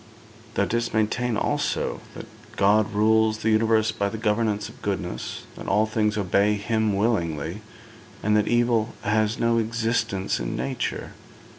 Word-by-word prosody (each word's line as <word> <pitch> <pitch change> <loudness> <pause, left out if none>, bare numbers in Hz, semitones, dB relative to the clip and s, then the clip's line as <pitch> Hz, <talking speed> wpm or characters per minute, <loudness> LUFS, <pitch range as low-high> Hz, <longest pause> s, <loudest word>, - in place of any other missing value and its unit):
Thou 100 - +2
didst 115 0 -1
maintain, 110 +2 +1
also, - - -1
that - - -7 0.3
God 105 +2 +3
rules 110 +1 +3
the 110 0 0
universe 110 0 +3
by 100 0 -1
the 110 - -5
governance 105 -1 0
of - - -14
goodness, 95 -3 -4
that - - -9
all 105 +2 +3
things 110 -1 0
obey 100 +1 +2
Him 110 0 0
willingly, 85 -4 -1 0.6
and 105 +1 +3
that 105 -1 +2
evil 120 -2 +2
has 110 +2 +1
no 115 0 +2
existence 110 -4 -1
in 110 - -3
nature. 130 +3 -3
110 Hz, 145 wpm, -25 LUFS, 105-115 Hz, 0.6 s, God